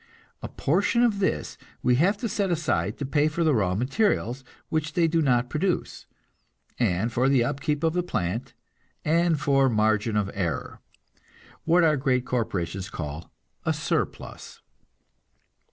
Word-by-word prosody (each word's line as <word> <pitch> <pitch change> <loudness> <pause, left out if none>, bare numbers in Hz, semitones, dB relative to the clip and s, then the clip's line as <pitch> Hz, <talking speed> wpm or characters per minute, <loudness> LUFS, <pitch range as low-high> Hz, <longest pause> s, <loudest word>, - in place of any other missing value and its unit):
A - - -5
portion 200 - +1
of 220 -4 +2
this 75 - -1 0.2
we 125 - +4
have 190 +8 +3
to 230 - -3
set 205 -2 -1
aside 110 - 0
to 140 - -3
pay 145 +2 +2
for 155 +2 -1
the 155 -2 +3
raw 95 -6 +1
materials 130 - 0 0.3
which 155 -1 -1
they 170 -2 +3
do 165 0 +1
not 125 -4 +2
produce, 170 +8 -2 0.7
and 110 0 +1
for 125 +3 +2
the 135 -3 +4
upkeep 145 +4 -2
of 160 -1 +2
the 180 - +1
plant, 115 - -3 0.5
and 165 0 +2
for 135 -2 +3
margin 110 -1 +1
of 100 -1 0
error 90 -6 -3 0.9
what 170 +2 +4
our 155 -2 +4
great 130 -2 +1
corporations 95 -5 -2
call 75 0 -6 0.3
a - - +1
surplus. - - -4
135 Hz, 150 wpm, -26 LUFS, 110-165 Hz, 0.9 s, we